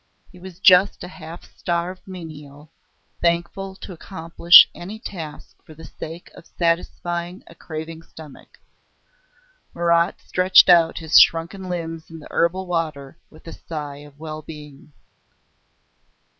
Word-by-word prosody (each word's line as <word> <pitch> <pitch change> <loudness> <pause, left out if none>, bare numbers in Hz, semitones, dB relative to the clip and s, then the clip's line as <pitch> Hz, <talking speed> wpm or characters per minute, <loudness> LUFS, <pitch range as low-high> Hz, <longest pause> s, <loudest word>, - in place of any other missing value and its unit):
He 180 - -16
was 185 -1 -12
just 190 0 +5
a - - -6
half 170 -2 -11
starved 175 +2 -4
menial, 150 -5 -11 0.5
thankful 175 +3 -1
to 190 - -10
accomplish 170 0 +5
any 195 +5 -9
task 165 -8 -10
for 155 - -15
the 160 +1 -12
sake 165 +2 -10
of - - -15
satisfying 175 +1 -2
a - - -15
craving 160 0 -8
stomach. 155 -3 -15 1.2
Marat 170 0 +1
stretched 185 +1 +4
out 170 -2 +5
his 160 -2 +5
shrunken 170 +3 +2
limbs 165 -2 -5
in 165 - -10
the 155 - -13
herbal 185 +3 0
water 155 -6 -4
with 155 - -19
a 165 - -9
sigh 150 -3 -7
of 145 -1 -15
well 155 0 -7
being. 150 -2 -12
170 Hz, 130 wpm, -21 LUFS, 155-180 Hz, 1.2 s, just